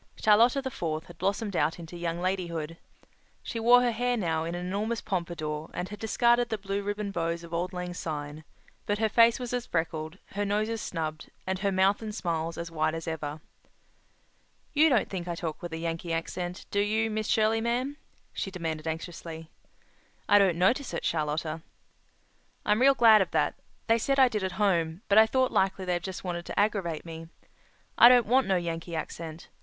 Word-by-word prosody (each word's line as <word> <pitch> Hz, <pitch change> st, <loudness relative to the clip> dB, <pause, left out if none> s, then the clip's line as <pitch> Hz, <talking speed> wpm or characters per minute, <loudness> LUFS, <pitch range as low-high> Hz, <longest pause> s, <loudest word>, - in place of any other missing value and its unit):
Charlotta 235 Hz, +6 st, +4 dB
the 265 Hz, -, -3 dB
Fourth 160 Hz, -6 st, -3 dB
had 170 Hz, -2 st, -14 dB
blossomed 200 Hz, +2 st, -1 dB
out 155 Hz, 0 st, +1 dB
into 170 Hz, 0 st, -9 dB
young 170 Hz, 0 st, -3 dB
ladyhood. 170 Hz, -4 st, -2 dB, 0.7 s
She 230 Hz, -, -4 dB
wore 245 Hz, +2 st, +6 dB
her 245 Hz, -, +2 dB
hair 245 Hz, +2 st, 0 dB
now 165 Hz, -6 st, 0 dB
in 170 Hz, +1 st, -3 dB
an 175 Hz, 0 st, -4 dB
enormous 210 Hz, +5 st, -2 dB
pompador 165 Hz, -5 st, -3 dB
and 180 Hz, +1 st, -3 dB
had 210 Hz, -1 st, -8 dB
discarded 240 Hz, +2 st, +2 dB
the 220 Hz, -, -1 dB
blue 200 Hz, 0 st, -3 dB
ribbon 205 Hz, 0 st, -3 dB
bows 170 Hz, -2 st, -2 dB
of 170 Hz, 0 st, -10 dB
auld 175 Hz, +2 st, -1 dB
lang 180 Hz, -1 st, -5 dB
syne, 150 Hz, -2 st, -5 dB, 0.4 s
but 205 Hz, -, +1 dB
her 220 Hz, +1 st, +2 dB
face 230 Hz, +3 st, +5 dB
was 245 Hz, -1 st, -5 dB
as 245 Hz, -1 st, -2 dB
freckled, 160 Hz, 0 st, -2 dB
her 205 Hz, +1 st, -2 dB
nose 210 Hz, +2 st, 0 dB
as 225 Hz, -1 st, -3 dB
snubbed, 155 Hz, -2 st, -4 dB, 0.2 s
and 190 Hz, 0 st, -2 dB
her 200 Hz, 0 st, 0 dB
mouth 190 Hz, +2 st, +3 dB
and 215 Hz, -2 st, -5 dB
smiles 165 Hz, -4 st, -2 dB
as 170 Hz, 0 st, -5 dB
wide 155 Hz, 0 st, 0 dB
as 165 Hz, 0 st, -6 dB
ever. 155 Hz, -1 st, -4 dB, 1.3 s
"You 310 Hz, +2 st, +5 dB
don't 245 Hz, -7 st, +2 dB
think 180 Hz, -3 st, -5 dB
I 170 Hz, -, -2 dB
talk 165 Hz, -2 st, -5 dB
with 175 Hz, -, -6 dB
a 160 Hz, -, -4 dB
Yankee 165 Hz, +1 st, -3 dB
accent, 175 Hz, +2 st, -4 dB
do 200 Hz, -, +1 dB
you, 220 Hz, +2 st, +1 dB
Miss 215 Hz, 0 st, -2 dB
Shirley, 220 Hz, +1 st, +2 dB
ma'am?" 245 Hz, +5 st, -1 dB, 0.4 s
she -, -, -3 dB
demanded 165 Hz, -4 st, -4 dB
anxiously. 165 Hz, 0 st, -6 dB, 0.8 s
"I 205 Hz, -, +6 dB
don't 190 Hz, -4 st, +3 dB
notice 235 Hz, +10 st, +1 dB
it, -, -, -4 dB
Charlotta." 155 Hz, 0 st, -1 dB, 1.0 s
"I'm 210 Hz, +3 st, +2 dB
real 275 Hz, +1 st, +6 dB
glad 225 Hz, -4 st, +7 dB
of 190 Hz, -, 0 dB
that. -, -, +2 dB, 0.3 s
They 230 Hz, 0 st, +3 dB
said 275 Hz, +4 st, +1 dB
I 260 Hz, -2 st, +6 dB
did 210 Hz, -4 st, -2 dB
at 190 Hz, -1 st, -2 dB
home, 175 Hz, -3 st, 0 dB
but 205 Hz, +2 st, +6 dB
I 220 Hz, -, +7 dB
thought 260 Hz, +2 st, +1 dB
likely 190 Hz, 0 st, +1 dB
they 180 Hz, -1 st, 0 dB
just 185 Hz, +2 st, -6 dB
wanted 175 Hz, -2 st, -4 dB
to -, -, -2 dB
aggravate 195 Hz, -7 st, 0 dB
me. 165 Hz, 0 st, -8 dB, 0.7 s
I 240 Hz, -, +11 dB
don't 245 Hz, -2 st, +6 dB
want 255 Hz, +4 st, +3 dB
no 190 Hz, -, +2 dB
Yankee 170 Hz, -1 st, -3 dB
accent. 160 Hz, 0 st, -6 dB
185 Hz, 195 wpm, -28 LUFS, 165-220 Hz, 1.3 s, I